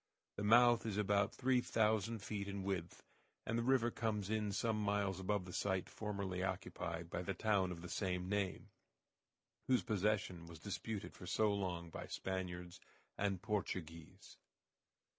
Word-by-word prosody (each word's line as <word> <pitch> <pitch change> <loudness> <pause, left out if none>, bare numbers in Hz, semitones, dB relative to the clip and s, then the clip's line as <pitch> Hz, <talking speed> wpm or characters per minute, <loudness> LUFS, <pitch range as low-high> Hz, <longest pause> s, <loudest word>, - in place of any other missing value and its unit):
The 105 - -2
mouth 120 +2 +7
is 105 -2 -1
about 100 0 +3
three 130 -1 +3
thousand 110 -2 +1
feet 100 -1 -3
in 100 -1 -3
width, 95 -3 -3 0.4
and 110 - -1
the 115 - +2
river 120 -1 +3
comes 105 -3 -1
in 105 -2 +1
some 110 +1 +1
miles 100 -2 +1
above 95 0 0
the 90 - -8
site 95 -2 0
formerly 100 -4 -3
occupied 85 -2 -3
by 90 - -1
the 95 +1 -2
town 100 -2 +2
of 85 -1 -6
the - - -5
same 90 -1 -1
name, 100 -1 -1 1.0
whose 130 -1 +4
possession 105 -5 0
was 85 -1 -9
disputed 100 +4 -4
for 90 - -10
so 105 +1 +3
long 90 -4 -2
by - - -6
Spaniards 90 -2 -4 0.4
and 100 -2 -1
Portuguese. 90 -7 -4
100 Hz, 155 wpm, -39 LUFS, 90-110 Hz, 1.0 s, mouth